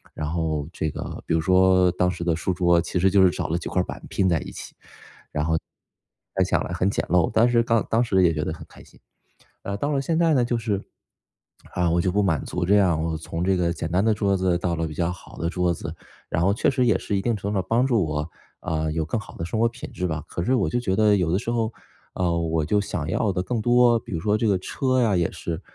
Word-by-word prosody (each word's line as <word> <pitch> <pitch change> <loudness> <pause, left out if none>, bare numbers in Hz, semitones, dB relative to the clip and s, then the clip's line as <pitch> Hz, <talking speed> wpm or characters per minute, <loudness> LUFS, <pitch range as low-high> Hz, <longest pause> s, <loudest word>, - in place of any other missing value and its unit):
然 75 - -3
后 80 -2 -2
这 80 - -2
个 - - -6
比 - - +1
如 80 - +2
说 95 0 +4
当 90 0 +1
时 85 - -4
的 85 -2 +1
书 90 - -2
桌 85 -1 +3
其 90 - -3
实 95 +1 +3
就 95 0 +5
是 95 - +6
找 90 -2 -3
了 85 +2 0
几 - - -6
块 90 - +1
板 - - -8
拼 95 - +1
在 85 -3 +2
一 - - -7
起。 - - -9 0.6
然 75 - -1
后 80 0 +1 0.9
想 - - +1
来 90 - -5
很 90 +2 0
简 - - -1
陋， 90 -1 +3
当 115 +2 +4
时 120 -1 +3
刚 115 -1 +1
当 115 +2 +3
时 95 -5 +2
也 85 - +5
觉 75 -1 -2
得 80 - -2
很 80 - -10
开 - - -15
心。 - - -21 0.6
啊， 100 0 -3
到 145 +7 -1
了 140 - +1
现 160 +3 -1
在 165 -2 +3
呢， 130 -4 +3
就 120 0 0
是， 105 -3 -2 0.9
啊， 90 -1 +1
我 85 - +2
就 90 - 0
不 105 +2 +1
满 80 -7 +1
足 90 -1 -2
这 100 +4 +4
样。 85 -5 +2
我 80 0 -1
从 85 +2 -4
这 95 +1 +2
个 85 -1 +1
简 85 -1 -5
单 95 +2 +2
的 110 - +4
桌 100 -2 +1
子 90 -1 +1
到 85 -1 -1
了 80 0 -2
比 80 - -7
较 85 +2 0
好 90 - -12
的 85 0 -2
桌 90 -1 +1
子， - - -7 0.3
然 80 - 0
后 95 - +3
确 110 - 0
实 130 -1 +1
也 110 -6 +3
是 100 - -3
一 - - 0
定 120 +2 0
程 100 +1 -4
度 105 - -2
上 - - -3
帮 120 +3 +3
助 115 -7 +2
我， 75 +1 -3 0.3
啊， 80 -1 -1
有 80 0 -1
更 110 - -2
好 - - -13
的 85 - -4
生 110 +5 -3
活 115 - +3
品 120 +1 -9
质 90 - -2
吧。 80 -3 -3
可 85 - -4
是 130 +8 +2
我 100 - +1
就 120 - 0
觉 95 -6 -1
得 105 -1 +4
有 85 -3 0
的 90 - +2
时 115 - -3
候， 115 -1 0 0.4
啊， 90 -2 0
我 80 -2 0
就 105 +6 +2
想 85 -6 -4
要 100 +3 +1
得 90 -1 -2
更 115 +3 -2
多。 120 0 +4
比 115 - -12
如 85 - -1
说 105 +5 +1
这 115 - 0
个 100 -2 +3
车 130 +6 0
呀 110 -5 +2
也 85 -2 +1
是， 85 0 -5
90 Hz, 295 characters per minute, -24 LUFS, 85-110 Hz, 0.9 s, 是